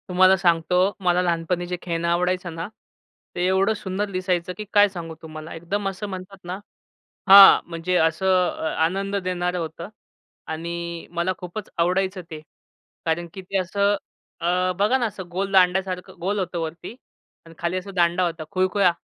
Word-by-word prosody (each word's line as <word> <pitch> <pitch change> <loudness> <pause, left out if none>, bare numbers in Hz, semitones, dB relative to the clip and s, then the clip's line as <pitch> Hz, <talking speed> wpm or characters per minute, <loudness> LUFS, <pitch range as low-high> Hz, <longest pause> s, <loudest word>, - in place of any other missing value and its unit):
तुम्हाला 185 +1 +5
सांगतो, 180 +2 +2
मला 180 -1 +2
लहानपणी 175 0 -1
जे 180 0 -3
खेळणं 170 -1 -2
आवडायचं 180 0 0
ना, 165 +2 -4 0.7
ते 175 - 0
एवढं 190 +3 +3
सुंदर 205 -1 -3
दिसायचं, 180 -1 -1
की 215 - -6
काय 205 -1 +7
सांगू 170 -4 -7
तुम्हाला. 155 0 -9
एकदम 195 +5 -3
असं 195 +2 -6
म्हणतात 190 +1 -8
ना 180 +2 -5 0.7
हां, 195 0 +10
म्हणजे 170 +2 -1
असं 165 +3 +1 0.2
अ, - - -7 0.2
आनंद 195 +4 -1
देणारं 180 -1 -1
होतं. 165 +1 -6 0.6
आणि 170 +1 -5
मला 170 +2 -1
खूपच 180 +3 -7
आवडायचं 185 +2 +1
ते. 155 -1 -7 0.7
कारण 165 +1 0
की 190 - -7
ते 195 +1 -2
असं 200 +2 +1 0.4
अ, 180 +2 +1
बघा 210 +6 +3
ना, 240 - +1
असं 190 -4 -7
गोल 195 +2 -3
दांड्यासारखं 185 0 +2
गोल 200 +4 -1
होतं 180 -2 -2
वरती 165 +5 -5 0.5
आणि 165 - -14
खाली 170 +2 -1
असा 190 +2 -8
दांडा 175 +1 +3
होता. 165 -2 -4
खुळखुळा. 185 -1 +2
180 Hz, 160 wpm, -23 LUFS, 170-190 Hz, 0.7 s, हां